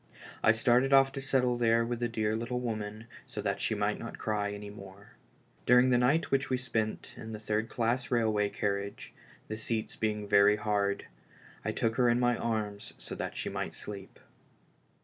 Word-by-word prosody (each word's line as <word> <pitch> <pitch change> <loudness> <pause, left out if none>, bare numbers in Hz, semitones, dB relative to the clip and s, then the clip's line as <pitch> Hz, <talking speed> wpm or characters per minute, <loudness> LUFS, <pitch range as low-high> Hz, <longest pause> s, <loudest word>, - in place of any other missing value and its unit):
I 110 - +6
started 120 +4 +3
off 135 0 +6
to 135 - -5
settle 125 -2 +1
there 115 0 +3
with 120 0 -3
the 120 - 0
dear 110 -2 0
little 120 +2 -2
woman 110 -2 -4 0.2
so - - -6
that - - -1
she - - 0
might - - 0
not - - -7
cry 105 -1 -1
any 105 0 -7
more. 100 0 -12 0.6
During 125 +1 +6
the 125 - +4
night 140 +7 +2
which 135 0 +1
we 130 - +2
spent 115 -4 -2
in 110 0 -7
the 105 - -5
third 110 +1 -1
class 120 +2 0
railway 110 -4 +2
carriage, 100 0 -3 0.3
the 110 - -4
seats 110 0 -2
being 105 -1 -1
very 100 0 +6
hard, 105 -2 0 0.6
I - - -1
took 115 0 -1
her 125 -2 +4
in 120 +1 +3
my 120 -1 +3
arms 105 -3 -3
so - - -8
that - - -5
she - - -3
might - - -4
sleep. 100 -2 -9
110 Hz, 190 wpm, -31 LUFS, 105-120 Hz, 0.6 s, I